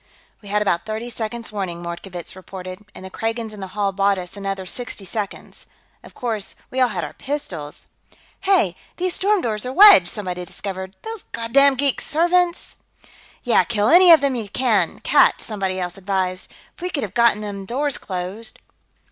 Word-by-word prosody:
"We 205 - -11
had 210 +1 +1
about 175 -1 0
thirty 220 +3 -4
seconds' 230 0 -4
warning," 180 -4 -4
Mordkovitz 175 +1 -7
reported, 185 +1 -9
"and 190 - -10
the 190 - -9
Kragans 225 +1 -3
in 210 - -10
the 190 - -5
hall 200 -1 +1
bought 200 0 +2
us 180 +1 -7
another 195 -1 -4
sixty 230 0 -3
seconds. 205 +1 -5 0.4
Of - - -15
course, 220 -5 -4 0.2
we 260 - -1
all 255 - +5
had 185 -7 -3
our 150 - -6
pistols...." 180 - -6 0.5
"Hey! 375 - +2 0.2
These 365 0 -1
storm 400 +1 +2
doors 215 -3 -1
are 250 - -3
wedged!" 330 - +8
somebody 180 -3 -4
discovered. 190 +1 -7
"Those 445 -2 -5
goddam 275 +4 +3
geek 275 0 +1
servants 350 +2 +1 0.3
...!" - - -26
"Yeah, 245 - +4
kill 220 -2 +1
any 355 +2 +8
of 325 - +8
them 280 -1 +1
you 225 -5 -4
catch," 240 -1 +2
somebody 195 -4 -3
else 180 +1 -4
advised. 185 -1 -2 0.2
"If - - -19
we 360 - -2
could 295 -7 -2
have 200 -3 -5
gotten 235 -2 +3
these 200 -2 -6
doors 280 +5 0
closed...." 190 +4 -6
210 Hz, 180 wpm, -21 LUFS, 190-255 Hz, 0.5 s, wedged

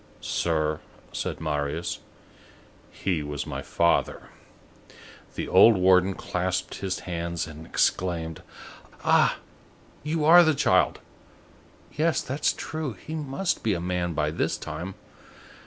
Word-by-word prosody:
"Sir," 80 -2 0 0.3
said - - -3
Marius, 75 -2 -2 0.9
"he 90 -5 -2
was 75 -1 -4
my - - -5
father." 85 0 0 1.1
The - - -3
old 115 -3 +7
warden 95 +1 +4
clasped 90 0 -2
his 95 -1 -3
hands 85 -1 -3
and 80 0 -10
exclaimed:— 80 -3 0 0.6
"Ah! - - +4 0.6
you 150 +1 -1
are 175 +3 +9
the 160 -2 +3
child! - - +2 0.9
Yes, 160 +2 +1
that's 135 +3 0
true, 155 -5 -4
he 105 - -9
must 155 +4 -2
be 110 -4 +1
a - - -3
man 90 -1 -2
by 75 0 0
this 80 - -1
time. 95 +3 -6
90 Hz, 120 wpm, -26 LUFS, 80-135 Hz, 1.1 s, are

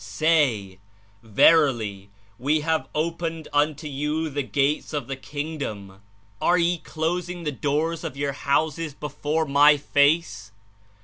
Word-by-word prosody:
Say: 105 - +1 0.4
Verily, 110 -4 +3 0.3
We 150 +5 +1
have 160 +1 0
opened 165 0 -2
unto 150 +1 +1
you 150 +3 -2
the 145 +1 -1
Gates 140 +3 -1
of 145 -4 -2
the 135 +2 -4
Kingdom; 135 -10 -6 0.4
are 175 - +3
ye 170 0 +1
closing 175 +3 -3
the 150 - -1
door 150 +4 -1
of 150 -4 -6
your 140 0 -1
houses 150 +2 -1
before 150 +2 -2
My 145 +1 +5
Face? 145 -7 +1
150 Hz, 125 wpm, -24 LUFS, 135-160 Hz, 0.4 s, My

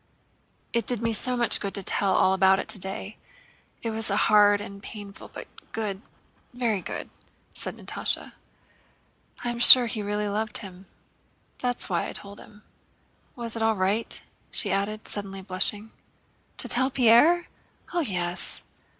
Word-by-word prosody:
"It 235 0 -1
did 245 -3 0
me 230 0 0
so 250 +3 +1
much 235 -1 +3
good 200 -1 -5
to 200 - -3
tell 195 +1 +2
all 190 - +3
about 190 0 +3
it - - -5
today. 195 +1 0 0.7
It 230 - -2
was 220 0 -4
hard 205 0 +3
and 200 -1 -9
painful, 200 -1 -11
but - - -10 0.3
good, 205 -3 -4 0.5
very 230 -6 -1
good!" 175 - -7 0.4
said - - -4
Natásha. - - -4 1.1
"I 240 - -2
am 235 - -7
sure 245 +1 +12
he 220 -2 -4
really 210 +1 -3
loved 215 +1 -3
him. 190 -2 -12 0.7
That 245 -1 -2
is - - -5
why 175 -4 -2
I - - -7
told 200 0 -7
him... 210 0 -17 0.7
Was 235 -2 -8
it 225 - -5
all 220 0 +1
right?" 195 +4 -2 0.3
she 205 - +1
added, 205 +2 -3
suddenly 195 -2 -7
blushing. 205 +3 -2 0.7
"To - - -3
tell 260 +2 +2
Pierre? 265 +8 +4 0.5
Oh, 350 - 0
yes. 180 - -3
210 Hz, 155 wpm, -25 LUFS, 195-230 Hz, 1.1 s, sure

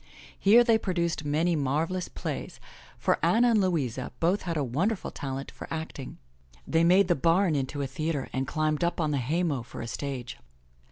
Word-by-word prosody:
Here 225 +5 +7
they 230 -2 +4
produced 170 -6 -1
many 160 +4 +1
marvelous 160 +6 -1
plays, - - -5 0.4
for - - 0
Anna 240 +2 +4
and 215 -2 +4
Louisa 135 -10 -1
both 180 +5 +2
had 170 -3 -3
a 145 - +1
wonderful 175 - -1
talent 135 0 -5
for - - -9
acting. 160 -5 -6 0.5
They 165 - +2
made 180 +3 +5
the 175 - +4
bam 170 +4 +3
into 140 0 -2
a - - 0
theatre 145 +1 -2
and 130 0 -1
climbed 155 +1 0
up 170 +1 0
on 155 -2 +1
the 140 - 0
haymow 150 +1 0
for 115 - -10
a - - -4
stage. 125 +1 -5
160 Hz, 180 wpm, -28 LUFS, 140-180 Hz, 0.5 s, Here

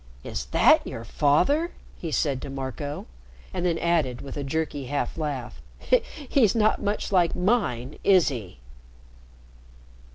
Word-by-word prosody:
"Is - - -4
that 60 - +4
your 115 - -6
father?" 280 - +2 0.2
he 165 - -6
said 140 -4 0
to - - -6
Marco. 135 +2 -5 0.5
And 180 0 0
then 170 -2 +1
added, 155 -9 +1
with 135 - -8
a 145 - -3
jerky 145 -1 -2
half 145 +2 -2
laugh, 145 -6 -4 0.7
"He's 235 -8 +3
not 215 -1 +2
much 205 0 -2
like 175 -4 +3
mine, 165 - 0
is 185 -5 +5
he?" 110 - -7
150 Hz, 135 wpm, -26 LUFS, 130-180 Hz, 0.7 s, is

